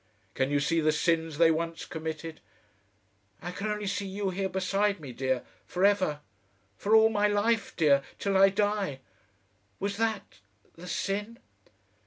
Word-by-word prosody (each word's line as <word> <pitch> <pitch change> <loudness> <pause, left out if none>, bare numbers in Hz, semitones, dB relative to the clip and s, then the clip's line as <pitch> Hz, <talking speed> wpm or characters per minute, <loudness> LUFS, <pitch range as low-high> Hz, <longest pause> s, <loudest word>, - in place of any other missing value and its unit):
"Can 130 0 0
you 145 0 +2
see 160 +3 +1
the 155 0 +3
sins 160 0 0
they 165 0 +6
once 165 +1 -2
committed?" 160 0 -6 1.0
"I 175 - -6
can 200 +4 -4
only 210 -1 -2
see 195 0 -2
you 195 0 -2
here 190 +1 -2
beside 195 +2 0
me, 140 -5 -8
dear 130 0 -1 0.2
for 180 +2 +1
ever. 185 -8 +2 0.5
For 210 +2 +2
all 220 0 +7
my 210 -1 +2
life, 210 +1 +1
dear, 145 -4 +4 0.2
till 200 -1 -1
I 195 +1 +7
die. 200 -8 -1 0.8
Was 200 0 -2
that 220 - -2 0.3
the 175 +2 -11
sin?"... 205 +5 -3
190 Hz, 155 wpm, -29 LUFS, 160-205 Hz, 1.0 s, all